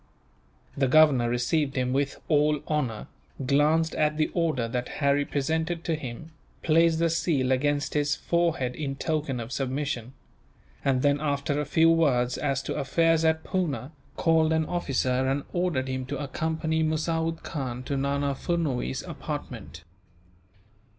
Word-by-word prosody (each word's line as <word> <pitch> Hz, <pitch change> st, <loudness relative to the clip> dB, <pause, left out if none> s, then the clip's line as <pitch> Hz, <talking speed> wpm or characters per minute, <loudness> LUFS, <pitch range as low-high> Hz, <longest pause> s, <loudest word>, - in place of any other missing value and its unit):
The 135 Hz, -1 st, +2 dB
governor 135 Hz, -4 st, +5 dB
received 135 Hz, +4 st, 0 dB
him 125 Hz, -1 st, 0 dB
with 140 Hz, +1 st, -1 dB
all 150 Hz, -1 st, +3 dB
honour, 130 Hz, -9 st, -1 dB, 0.4 s
glanced 150 Hz, +4 st, +3 dB
at 150 Hz, 0 st, +1 dB
the 155 Hz, -, +1 dB
order 155 Hz, -9 st, 0 dB
that 125 Hz, +1 st, -3 dB
Harry 140 Hz, 0 st, +2 dB
presented 160 Hz, +5 st, -1 dB
to 165 Hz, -, -1 dB
him, 150 Hz, +1 st, -6 dB, 0.3 s
placed 165 Hz, 0 st, +4 dB
the 170 Hz, +1 st, +2 dB
seal 160 Hz, -5 st, +1 dB
against 145 Hz, +2 st, +1 dB
his 145 Hz, -1 st, +1 dB
forehead 165 Hz, -8 st, 0 dB
in 135 Hz, 0 st, -3 dB
token 150 Hz, -3 st, -2 dB
of 115 Hz, +1 st, -6 dB
submission; 130 Hz, -2 st, -3 dB, 0.7 s
and 130 Hz, -2 st, +1 dB
then, 145 Hz, 0 st, +3 dB
after 145 Hz, 0 st, 0 dB
a -, -, -3 dB
few 160 Hz, +3 st, +4 dB
words 125 Hz, -7 st, +2 dB
as 135 Hz, -2 st, -1 dB
to -, -, -3 dB
affairs 165 Hz, +4 st, +2 dB
at 160 Hz, 0 st, +2 dB
Poona, 155 Hz, -7 st, -2 dB, 0.2 s
called 160 Hz, -1 st, +3 dB
an 160 Hz, 0 st, +1 dB
officer 130 Hz, -6 st, 0 dB
and 135 Hz, +1 st, 0 dB
ordered 175 Hz, -7 st, 0 dB
him 130 Hz, -1 st, -3 dB
to -, -, -3 dB
accompany 160 Hz, +2 st, -1 dB
Musawood 160 Hz, +1 st, -1 dB
Khan 130 Hz, -4 st, -4 dB
to 140 Hz, -, -3 dB
Nana 140 Hz, +1 st, 0 dB
Furnuwees' 140 Hz, -, -2 dB
apartment. 80 Hz, +1 st, -6 dB
145 Hz, 145 wpm, -27 LUFS, 130-160 Hz, 0.7 s, governor